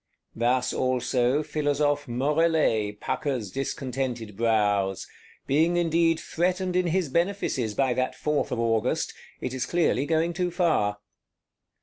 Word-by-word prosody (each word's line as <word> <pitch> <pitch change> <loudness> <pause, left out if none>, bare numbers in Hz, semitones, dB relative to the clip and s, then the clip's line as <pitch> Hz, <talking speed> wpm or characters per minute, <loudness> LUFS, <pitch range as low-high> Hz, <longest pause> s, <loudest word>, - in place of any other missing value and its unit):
Thus 125 +2 +1
also 130 +2 +1
Philosophe 145 -2 0
Morellet 135 -6 +1
puckers 125 -9 -2
discontented 130 -4 -3
brows; 105 -4 +1 0.4
being 160 +5 +2
indeed 165 -1 +2
threatened 180 +2 -1
in 180 -1 +2
his 175 0 +1
benefices 155 - -1
by 135 -2 +2
that 130 +1 -1
Fourth 150 -1 -1
of 125 - -2
August: 115 +1 0 0.3
it 125 - -3
is 130 -1 -2
clearly 165 -5 +1
going 165 +1 +1
too 180 +1 -1
far. 165 - +1
135 Hz, 120 wpm, -26 LUFS, 120-165 Hz, 0.4 s, being